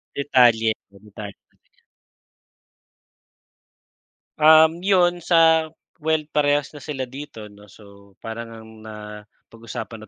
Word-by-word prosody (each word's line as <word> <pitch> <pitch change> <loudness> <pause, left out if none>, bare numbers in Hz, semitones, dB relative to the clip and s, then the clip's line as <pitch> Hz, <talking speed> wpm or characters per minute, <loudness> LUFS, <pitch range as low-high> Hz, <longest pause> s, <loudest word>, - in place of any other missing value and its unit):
Detalye 120 -5 +3 0.2
oo, 100 - -18
detalye, 105 -1 -10
mga - - -75
ganyan. - - -38 2.6
Um, 160 +2 +5
yun 175 -3 +2
sa 160 -2 +3 0.3
well 160 0 0
parehas 145 -1 +1
na 145 - -11
sila 130 -4 -5
dito, 130 -6 -10
'no? 105 0 -17
So 100 -1 -18
parang 115 +1 -7
ngang 110 0 -13
napag-usapan 110 +1 -10
na - - -27
125 Hz, 115 wpm, -22 LUFS, 110-155 Hz, 2.6 s, Um